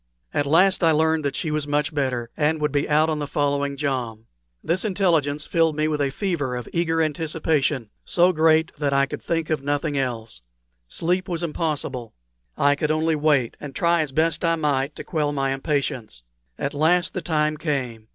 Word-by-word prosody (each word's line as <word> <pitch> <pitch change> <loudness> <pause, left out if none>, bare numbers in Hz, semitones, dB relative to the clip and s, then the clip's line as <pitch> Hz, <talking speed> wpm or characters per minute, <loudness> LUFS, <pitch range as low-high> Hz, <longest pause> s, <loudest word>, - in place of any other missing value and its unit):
At 145 -1 0
last 185 +5 +4
I 165 - +6
learned 160 0 +2
that 140 - -1
she 160 - -2
was 150 -1 -1
much 145 +2 0
better, 125 -5 -2
and 155 +1 +1
would 150 -1 0
be 145 +1 0
out 155 +1 +4
on 155 -1 -1
the 145 - -3
following 140 -1 -1
jom. 125 -6 -3 0.4
This 170 +3 0
intelligence 165 -8 +1
filled 165 -2 +2
me 155 +1 +1
with 150 -1 -1
a 140 - +1
fever 145 -6 -2
of 125 - -5
eager 165 -1 +1
anticipation, 150 -5 -1
so 180 +1 +3
great 160 0 +3
that 145 -2 0
I 140 0 +4
could 140 - -7
think 165 -1 -2
of 155 - 0
nothing 145 +1 -1
else. 115 - -4 0.5
Sleep 180 - -1
was 170 -1 -2
impossible. 150 -7 -3 0.4
I 145 0 +4
could 150 +1 -1
only 155 +1 +1
wait, 145 -5 +2
and 140 -2 -8
try 170 -1 +2
as 150 -3 -3
best 160 +4 +1
I 165 0 +3
might 145 -2 0
to - - -7
quell 150 -4 -1
my 135 -1 0
impatience. 135 - -2 0.3
At 140 - -3
last 165 +5 +2
the 185 - -3
time 155 -2 0
came. 125 -8 -3
150 Hz, 190 wpm, -23 LUFS, 140-160 Hz, 0.5 s, I